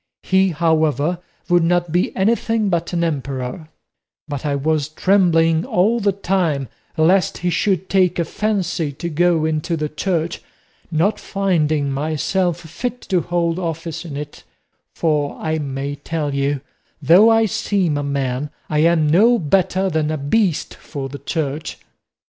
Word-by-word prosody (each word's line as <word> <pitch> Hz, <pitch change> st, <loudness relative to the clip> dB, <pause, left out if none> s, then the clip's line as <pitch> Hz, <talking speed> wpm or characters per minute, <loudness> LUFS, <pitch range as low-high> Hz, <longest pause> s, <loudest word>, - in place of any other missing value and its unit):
He, 190 Hz, 0 st, +3 dB
however, 160 Hz, 0 st, +1 dB, 0.3 s
would 175 Hz, -1 st, +4 dB
not 175 Hz, 0 st, +1 dB
be 175 Hz, +2 st, +1 dB
anything 220 Hz, +1 st, +1 dB
but 170 Hz, -2 st, -1 dB
an 170 Hz, -1 st, 0 dB
emperor; 140 Hz, -1 st, -3 dB, 0.6 s
but 145 Hz, 0 st, -4 dB
I 145 Hz, -, 0 dB
was 150 Hz, +1 st, 0 dB
trembling 165 Hz, -2 st, +3 dB
all 215 Hz, +7 st, +2 dB
the 200 Hz, -2 st, +2 dB
time 175 Hz, -, -1 dB, 0.3 s
lest 180 Hz, +4 st, +3 dB
he 180 Hz, 0 st, -1 dB
should 190 Hz, -1 st, 0 dB
take 185 Hz, -2 st, +2 dB
a 170 Hz, -, 0 dB
fancy 185 Hz, -5 st, -1 dB
to 170 Hz, +5 st, -5 dB
go 170 Hz, 0 st, +2 dB
into 160 Hz, +2 st, -1 dB
the 150 Hz, -1 st, -2 dB
Church, 170 Hz, +1 st, -2 dB, 0.5 s
not 170 Hz, +6 st, +1 dB
finding 155 Hz, -8 st, 0 dB
myself 160 Hz, +5 st, -1 dB
fit 240 Hz, +10 st, -5 dB
to 185 Hz, -3 st, +2 dB
hold 170 Hz, 0 st, -1 dB
office 165 Hz, -2 st, -4 dB
in 150 Hz, -5 st, -7 dB
it; 145 Hz, 0 st, -7 dB, 0.5 s
for 150 Hz, -3 st, 0 dB
I 160 Hz, 0 st, -1 dB
may 140 Hz, 0 st, -3 dB
tell 150 Hz, 0 st, -3 dB
you, 140 Hz, 0 st, 0 dB, 0.4 s
though 175 Hz, +10 st, +6 dB
I 225 Hz, 0 st, +4 dB
seem 190 Hz, -5 st, 0 dB
a 145 Hz, -, -1 dB
man, 140 Hz, -1 st, -2 dB, 0.2 s
I 150 Hz, -, +2 dB
am 165 Hz, 0 st, +3 dB
no 215 Hz, +10 st, +5 dB
better 190 Hz, +2 st, +1 dB
than 155 Hz, -4 st, 0 dB
a 155 Hz, -, -1 dB
beast 165 Hz, +4 st, 0 dB
for 140 Hz, -3 st, -7 dB
the 140 Hz, +1 st, -8 dB
Church." 150 Hz, -2 st, -3 dB
165 Hz, 150 wpm, -20 LUFS, 150-185 Hz, 0.6 s, though